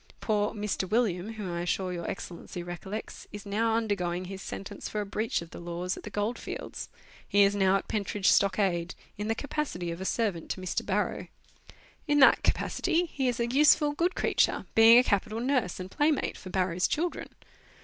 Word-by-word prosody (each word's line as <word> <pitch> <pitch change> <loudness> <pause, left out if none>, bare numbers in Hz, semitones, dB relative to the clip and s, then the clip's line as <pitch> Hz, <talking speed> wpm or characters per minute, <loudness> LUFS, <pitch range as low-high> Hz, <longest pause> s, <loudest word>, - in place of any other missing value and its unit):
Poor 210 -1 0
"Mr. 205 -3 -2
William," 215 -2 0
whom 210 -5 -5
I 170 - -3
am 175 - -2
sure 185 +1 -1
Your 170 -1 -4
Excellency 175 0 -6
recollects, 175 +4 -7
is 205 0 -8
now 220 +3 +1
undergoing 185 -5 -1
his 190 +1 -7
sentence 195 +1 -6
for 210 - -3
a 205 - -2
breach 215 -2 -2
of 165 - -14
the - - -9
laws 175 +1 -3
at - - -9
the - - -8
gold 210 +3 -2
fields; - - -6 0.4
he 200 0 +5
is 200 0 +4
now 195 -1 +3
at 195 - -1
Pentridge 205 -2 -1
Stockade, 190 -4 +2 0.2
in 210 - -2
the 225 - 0
capacity 265 - -3
of 170 +2 -6
a - - -4
servant 195 -7 -1
to - - -3
Mr. 185 -1 -2
Barrow. - - -1 0.8
In 290 -1 +3
that 270 - +7
capacity 355 -1 +1
he 265 -2 0
is 245 -1 -1
a 235 - +2
useful, 290 +4 +4
good 340 +5 0
creature, - - +1
being 225 +1 +8
a 250 - +7
capital 215 0 0
nurse 245 -8 0
and 185 +1 -7
playmate 295 0 +1
for 185 - -10
Barrow's 180 -1 +1
children. 340 +3 -2
205 Hz, 195 wpm, -29 LUFS, 180-230 Hz, 0.8 s, being